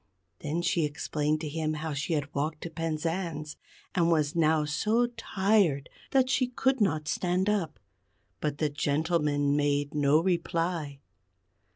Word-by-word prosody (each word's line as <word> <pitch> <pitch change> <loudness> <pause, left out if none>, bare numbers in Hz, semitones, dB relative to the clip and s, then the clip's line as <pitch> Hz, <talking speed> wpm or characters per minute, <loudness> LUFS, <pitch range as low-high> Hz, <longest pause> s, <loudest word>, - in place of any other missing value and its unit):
Then 160 +4 -2
she 170 -1 +2
explained 150 0 -1
to 160 - -3
him 155 +1 -2
how 155 0 -3
she 140 +3 -2
had 145 -2 -2
walked 150 +2 -2
to 170 - -6
Penzance, 165 -1 -3 0.4
and 170 -3 +2
was 155 -3 +1
now 160 -2 +3
so 215 +11 +1
tired 195 - +1 0.2
that 265 -1 +3
she 255 -1 +2
could 260 0 0
not 155 -6 +1
stand 180 +3 0
up. 200 - -1 0.6
But 150 -1 -2
the 155 0 +1
gentleman 145 -1 +1
made 145 0 +1
no 145 0 +4
reply. 165 -4 -1
155 Hz, 145 wpm, -29 LUFS, 150-175 Hz, 0.6 s, no